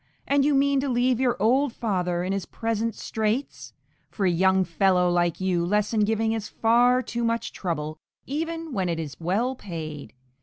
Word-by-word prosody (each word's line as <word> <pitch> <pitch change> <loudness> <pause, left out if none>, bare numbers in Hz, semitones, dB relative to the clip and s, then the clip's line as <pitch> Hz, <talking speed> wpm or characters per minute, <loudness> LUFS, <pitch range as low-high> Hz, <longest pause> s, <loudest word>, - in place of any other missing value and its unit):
and 280 0 +3
you 290 0 +3
mean 280 0 +3
to 275 +1 -1
leave 245 0 +2
your 250 -4 +1
old 255 +6 +3
father 180 -6 -1
in 185 +2 -1
his 195 -3 -3
present 225 -1 -2
straits? 220 +5 -3 0.4
For 200 - -2
a 180 - +4
young 190 +2 +3
fellow 180 +1 +2
like 175 -1 +1
you 185 -2 0
lesson 210 +4 +1
giving 220 +1 +1
is 220 -1 -3
far 245 +3 +3
too 235 -1 -3
much 230 0 -1
trouble, 155 -4 -4 0.3
even 325 +2 -4
when 185 -5 -1
it 165 -1 -2
is 150 -4 -5
well 200 +10 0
paid. 160 - -7
215 Hz, 180 wpm, -25 LUFS, 180-245 Hz, 0.4 s, a